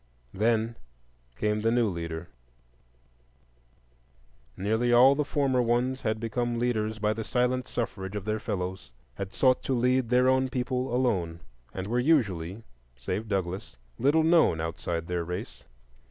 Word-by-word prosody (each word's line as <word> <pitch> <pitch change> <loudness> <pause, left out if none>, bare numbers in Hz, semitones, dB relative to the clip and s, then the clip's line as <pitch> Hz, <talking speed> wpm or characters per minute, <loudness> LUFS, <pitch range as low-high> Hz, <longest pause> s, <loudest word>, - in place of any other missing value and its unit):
Then 115 +2 +1 0.6
came 105 0 0
the 115 - +2
new 120 -1 +3
leader. 85 -2 -4 2.3
Nearly 110 +5 +1
all 125 +3 +7
the 150 +1 0
former 135 -3 +1
ones 125 +2 0
had 110 -2 -1
become 120 +1 -2
leaders 110 -2 0
by 105 0 +1
the 110 +1 -4
silent 125 +2 0
suffrage 100 -4 -4
of 100 -2 -4
their 110 0 -1
fellows, 95 -4 -4 0.2
had 95 +8 -6
sought 130 -2 +3
to 135 - +1
lead 125 0 +2
their 125 +1 +4
own 130 0 +3
people 125 0 -2
alone, 95 -10 0 0.3
and 95 - -5
were 120 +4 0
usually, 110 - +1 0.3
save 85 - -4
Douglass, 95 -7 -3 0.2
little 145 +6 +3
known 160 - +4
outside 80 +1 -3
their 85 0 -2
race. 90 +2 -6
115 Hz, 140 wpm, -28 LUFS, 95-125 Hz, 2.3 s, all